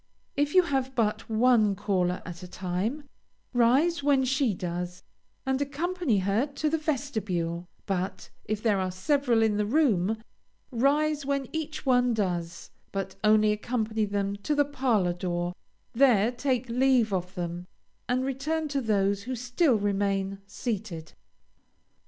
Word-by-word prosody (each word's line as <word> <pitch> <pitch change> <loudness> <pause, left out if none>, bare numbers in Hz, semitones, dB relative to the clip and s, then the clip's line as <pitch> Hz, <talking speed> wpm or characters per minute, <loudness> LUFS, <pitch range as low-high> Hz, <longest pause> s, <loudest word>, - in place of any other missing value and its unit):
If 290 +2 0
you 370 - +8
have 265 -4 -1
but 220 -3 0
one 220 -2 +4
caller 180 -2 0
at 170 0 -8
a 180 - -8
time, 190 +11 -3 0.5
rise 265 +8 +3
when 275 -2 +3
she 265 -1 +2
does, 180 +1 -4 0.4
and 265 +1 0
accompany 300 - 0
her 200 +8 +1
to 300 +2 -2
the 320 - +1
vestibule; 210 - -2 0.2
but, 190 -1 -3
if 215 0 -3
there 210 -4 +3
are 185 0 0
several 240 - +2
in 215 -2 +2
the 210 - +1
room, 220 - +2 0.5
rise 285 +4 +2
when 275 -1 -1
each 315 -1 -4
one 250 -2 +3
does, 175 -4 -3 0.2
but 195 -1 -3
only 215 0 +5
accompany 220 0 -1
them 200 0 -2
to 295 +9 -1
the 290 0 +3
parlor 245 -10 +1
door; 175 0 -2 0.4
there 235 -4 +4
take 255 0 -1
leave 245 -3 +3
of 180 0 -2
them, 175 0 -4 0.4
and 255 +1 +1
return 305 +4 -1
to 280 -1 -1
those 200 -3 +1
who 255 +1 -3
still 250 +4 +2
remain 195 -1 0
seated. 200 -7 -5
225 Hz, 145 wpm, -27 LUFS, 195-270 Hz, 0.5 s, you